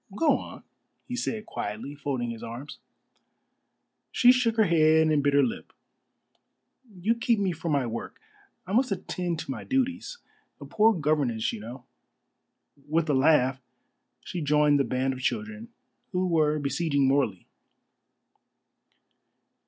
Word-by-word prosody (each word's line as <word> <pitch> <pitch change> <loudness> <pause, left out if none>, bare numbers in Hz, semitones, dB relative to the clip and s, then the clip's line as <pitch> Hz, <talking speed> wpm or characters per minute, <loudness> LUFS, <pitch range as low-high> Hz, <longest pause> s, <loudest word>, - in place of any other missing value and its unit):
"Go 300 +5 +3
on," - - -10 0.4
he 245 - -4
said 225 -3 -3
quietly, 110 - -5
folding 135 -5 -3
his 115 -1 -8
arms. 120 +5 -8 1.3
She 245 - +6
shook 240 -3 +1
her 220 - +5
head 160 -2 +4
and 150 -2 +2
bit 145 0 +1
her 140 - +5
lip. 240 +1 -4 1.2
"You 200 +4 0
keep 235 0 +1
me 195 -2 0
from 165 -1 -3
my 140 -3 +1
work. 115 0 -6 0.5
I 190 - -6
must 255 +1 +2
attend 180 -2 -3
to - - -6
my - - -6
duties. 265 - -2 0.4
A - - -9
poor 220 +1 +3
governess, 145 -8 0
you - - -6
know." 120 +4 -10 1.0
With 160 0 +1
a - - +1
laugh 135 -1 +3 0.6
she 175 - -6
joined 150 -1 +3
the - - +3
band 130 +1 -1
of 130 - -8
children, 215 - -3 0.4
who 185 0 +1
were 155 -3 +2
besieging 140 -1 0
Morley. 130 -9 0
155 Hz, 140 wpm, -27 LUFS, 135-210 Hz, 1.3 s, She